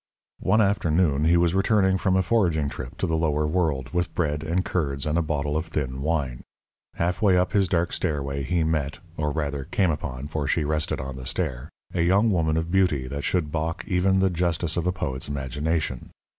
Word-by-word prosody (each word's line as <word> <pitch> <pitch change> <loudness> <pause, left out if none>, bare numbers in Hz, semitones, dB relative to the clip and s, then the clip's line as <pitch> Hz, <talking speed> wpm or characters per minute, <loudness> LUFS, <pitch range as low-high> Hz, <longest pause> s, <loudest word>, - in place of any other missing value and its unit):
One 105 +4 +3
afternoon 85 -7 +2
he 85 +2 +5
was 85 0 +3
returning 95 -1 +3
from 95 0 +2
a 95 - +3
foraging 85 -8 +2
trip 65 -3 -8
to - - 0
the 80 - 0
lower 75 -2 +1
world, 75 -5 0
with 90 0 -1
bread 75 -3 0
and 85 +4 0
curds 70 -6 -1
and 75 0 0
a 85 - +3
bottle 75 -2 -1
of 80 +1 -1
thin 65 -4 -3
wine. 70 -5 -1 0.5
Halfway 90 +2 +2
up 90 0 +1
his 100 -2 +3
dark 85 -1 0
stairway 70 -2 -1
he 85 +5 0
met 75 -3 -1 0.2
or 75 -2 -1
rather 70 -2 -2
came 95 +2 +1
upon, 70 -3 -4
for 75 -1 -3
she 80 +2 +1
rested 75 +1 -1
on 65 0 -5
the 65 -1 -7
stair 65 +4 -2 0.2
a 85 - 0
young 100 +6 +4
woman 80 -4 +1
of 80 - 0
a - - -10
beauty 90 -9 +2
that 70 +1 -4
should 85 -5 0
balk 80 +2 -2
even 95 +1 +2
the 95 -1 +3
justice 85 -1 0
of 85 0 -1
a - - +3
poet's 65 -8 -3
imagination. 70 0 -2
80 Hz, 205 wpm, -25 LUFS, 70-90 Hz, 0.5 s, he